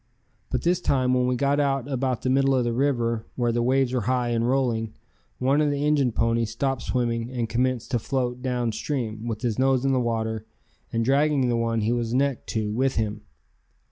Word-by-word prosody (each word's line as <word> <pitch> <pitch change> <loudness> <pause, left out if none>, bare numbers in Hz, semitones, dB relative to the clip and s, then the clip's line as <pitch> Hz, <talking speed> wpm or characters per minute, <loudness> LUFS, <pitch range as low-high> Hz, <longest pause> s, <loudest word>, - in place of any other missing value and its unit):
But - - -2
this 175 +1 +2
time 130 -5 +2
when 125 0 +2
we 125 - +1
got 140 +3 +1
out 135 -3 0
about 130 -3 -1
the 130 - 0
middle 135 0 +3
of 125 - +2
the 120 -1 -1
river 115 -4 0
where 120 -2 +1
the 120 +1 0
waves 130 +1 +2
were 125 - +1
high 125 -2 +1
and 115 0 +1
rolling, 120 -5 0 0.4
one 135 +4 +2
of 150 - +2
the 145 0 -1
Injun 145 -4 +2
ponies 115 0 +1
stopped 135 +2 -1
swimming 120 -2 -1
and 120 -3 -2
commenced 125 +1 -1
to 120 - +1
float 125 +1 -2
down 125 -3 -1
stream 110 -2 -3
with 110 -2 -3
his 120 -2 -1
nose 135 0 +2
in 135 - +3
the 130 - +2
water 110 -2 -2 0.4
and 115 0 0
dragging 140 0 +2
the 120 - +1
one 115 -1 0
he 110 +2 +1
was 120 -1 -1
necked 140 -1 0
to 110 -2 -2
with 130 +4 0
him. 110 -1 -2
125 Hz, 210 wpm, -25 LUFS, 115-135 Hz, 0.4 s, middle